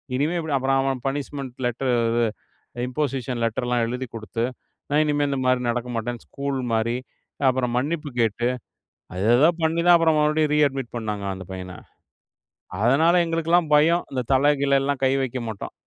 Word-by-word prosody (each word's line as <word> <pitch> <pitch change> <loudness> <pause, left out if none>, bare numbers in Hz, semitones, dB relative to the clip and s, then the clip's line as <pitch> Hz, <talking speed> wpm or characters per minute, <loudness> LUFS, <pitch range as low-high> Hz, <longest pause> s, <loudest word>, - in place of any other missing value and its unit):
இனிமே 150 +6 0
இப்டி 160 -3 -3
அப்பறம் 135 +1 +1
அவன் 135 -1 -1
பனிஷ்மெண்ட் 135 -2 -4
லெட்டர், 125 +2 -1 0.2
இது, 120 +1 +1 0.6
இம்போசிஷன் 130 -3 -2
லெட்டர்லாம் 120 +1 0
எழுதிக் 125 0 -5
குடுத்து, 115 +1 -4 0.5
நான் 150 +2 +3
இனிமே 145 -1 +1
இந்த 140 - -1
மாரி 130 0 +3
நடக்க 120 +1 -2
மாட்டேன்னு 120 +1 -4
ஸ்கூல் 140 -1 -3
மாரி, 115 +2 +1 0.5
அப்பறம் 125 -2 -1
மன்னிப்பு 150 +3 -2
கேட்டு 115 +1 +1 0.7
அது 95 +2 -2
ஏதோ 150 +6 +5
பண்ணித்தான் 170 +2 +4
அப்பறம் 160 -2 +3
மறுபடியும் 150 0 +2
ரீ-அட்மிட் 135 -4 +1
பண்ணாங்க 105 -3 -3
அந்த 95 0 -8
பையன. 95 0 -6 1.1
அதனால 150 +8 +4
எங்களுக்கெல்லாம் 165 0 +1
பயம். 165 +4 +4
இந்த 130 -2 -1
தல 145 +3 +4
கிலல்லாம் 140 0 +1
கை 130 - +4
வெக்க 130 -1 -3
மாட்டோம். 110 -3 -6
135 Hz, 150 wpm, -23 LUFS, 120-150 Hz, 1.1 s, ஏதோ